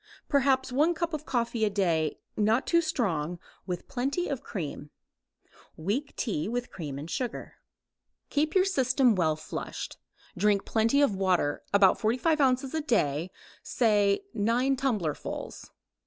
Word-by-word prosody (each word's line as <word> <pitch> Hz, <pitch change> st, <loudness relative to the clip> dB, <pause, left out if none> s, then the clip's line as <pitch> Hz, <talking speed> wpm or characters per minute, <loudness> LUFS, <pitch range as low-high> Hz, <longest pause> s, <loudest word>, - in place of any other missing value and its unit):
Perhaps 265 Hz, -2 st, +2 dB
one 305 Hz, +7 st, +2 dB
cup 335 Hz, 0 st, -2 dB
of 305 Hz, 0 st, -4 dB
coffee 235 Hz, -2 st, 0 dB
a 215 Hz, -, +3 dB
day, 170 Hz, -6 st, 0 dB, 0.2 s
not 220 Hz, +3 st, +2 dB
too 335 Hz, 0 st, +3 dB
strong, 180 Hz, -, -1 dB, 0.3 s
with 180 Hz, -2 st, -4 dB
plenty 275 Hz, +7 st, -1 dB
of 275 Hz, -3 st, -3 dB
cream. 150 Hz, -6 st, -6 dB, 0.9 s
Weak 210 Hz, -, -2 dB
tea 195 Hz, -, -2 dB
with 245 Hz, +2 st, -3 dB
cream 145 Hz, -6 st, -6 dB
and 145 Hz, +3 st, -6 dB
sugar. 240 Hz, +7 st, -4 dB, 0.7 s
Keep 305 Hz, +3 st, 0 dB
your 375 Hz, 0 st, +5 dB
system 260 Hz, -, +3 dB
well 160 Hz, -5 st, +1 dB
flushed. 155 Hz, -, -6 dB, 0.4 s
Drink 200 Hz, +1 st, +2 dB
plenty 230 Hz, +6 st, +3 dB
of 220 Hz, -8 st, +2 dB
water, 185 Hz, -6 st, +1 dB
about 200 Hz, -2 st, +5 dB
45 255 Hz, +8 st, +2 dB
ounces 260 Hz, +1 st, +2 dB
a 320 Hz, -, 0 dB
day, 175 Hz, -, 0 dB, 0.3 s
say 210 Hz, -, +2 dB
nine 240 Hz, +6 st, +2 dB
tumblerfuls. 220 Hz, -, -3 dB
230 Hz, 140 wpm, -28 LUFS, 185-275 Hz, 0.9 s, your